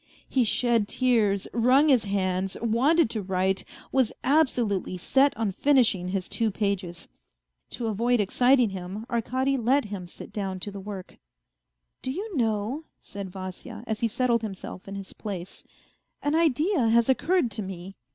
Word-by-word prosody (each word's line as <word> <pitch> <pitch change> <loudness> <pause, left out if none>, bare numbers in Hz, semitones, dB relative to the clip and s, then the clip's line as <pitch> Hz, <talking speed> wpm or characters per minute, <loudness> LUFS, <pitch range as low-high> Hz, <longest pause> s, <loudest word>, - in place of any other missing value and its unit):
He 260 - +2
shed 230 -1 +2
tears, 215 -7 +1
wrung 255 +6 +4
his 250 -6 +4
hands, 190 -1 -1
wanted 260 +9 +3
to 220 - -2
write, 190 0 0 0.3
was 260 -4 +2
absolutely 245 - +1
set 270 +10 +3
on 220 -3 0
finishing 230 -6 +3
his 185 0 -2
two 225 -2 0
pages. 190 -4 -3 0.6
To 240 - -5
avoid 230 +3 +1
exciting 245 +3 +3
him 190 +3 -6
Arkady 260 +4 0
let 260 +3 +2
him 195 -4 -6
sit - - -11
down 190 -3 -3
to 205 - -4
the 200 - -7
work. 195 -1 -8 0.4
" - - -56
Do - - -4
you 390 +8 -4
know," 230 +4 -1
said 200 -1 -7
Vasya, 185 +3 -8
as 220 -2 -3
he 230 - +2
settled 235 +1 +1
himself 195 -3 -7
in 195 - -6
his 195 -1 -7
place, 190 -4 -6 0.3
" - - -37
an 290 - +1
idea 315 - +2
has 235 0 +4
occurred 270 0 +2
to 215 - -2
me 190 0 -7
220 Hz, 160 wpm, -26 LUFS, 195-255 Hz, 0.6 s, wrung